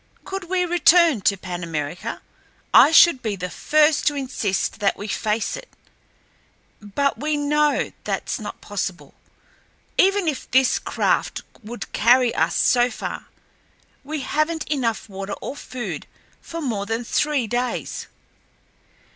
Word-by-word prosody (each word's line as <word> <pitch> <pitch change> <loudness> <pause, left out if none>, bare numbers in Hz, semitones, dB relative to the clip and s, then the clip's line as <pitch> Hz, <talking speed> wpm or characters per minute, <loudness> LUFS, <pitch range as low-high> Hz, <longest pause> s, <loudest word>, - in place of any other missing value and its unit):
Could 390 -1 -5
we 360 +1 0
return 340 - +4
to 200 +1 +2
Pan 180 -2 -6
America, 165 +1 -4 0.5
I - - +8
should 325 -5 +7
be 215 -4 -2
the 180 -1 -5
first 305 0 +2
to 295 - +2
insist 250 -9 -2
that 200 -2 +1
we 205 - -6
face 215 +2 -1
it. - - -10 1.1
But 275 +8 -1
we 300 +1 0
know 295 0 +1
thatl's - - -2
not - - -8
possible. - - -5 0.9
Even 390 -1 +4
if 295 -4 -3
this 260 0 +3
craft - - -1 0.2
would 235 +2 -8
carry 245 +1 +4
us - - +1
so 245 0 +3
far, 225 - -6 0.8
we 300 +1 -4
haven't 310 +4 -1
enough 240 -8 -1
water 195 0 -6
or - - -6
food 255 -3 -6 0.3
for 335 0 -7
more 215 -8 -2
than 225 +2 -2
three 290 +1 0
days. 245 +3 -3
255 Hz, 135 wpm, -22 LUFS, 215-305 Hz, 1.1 s, I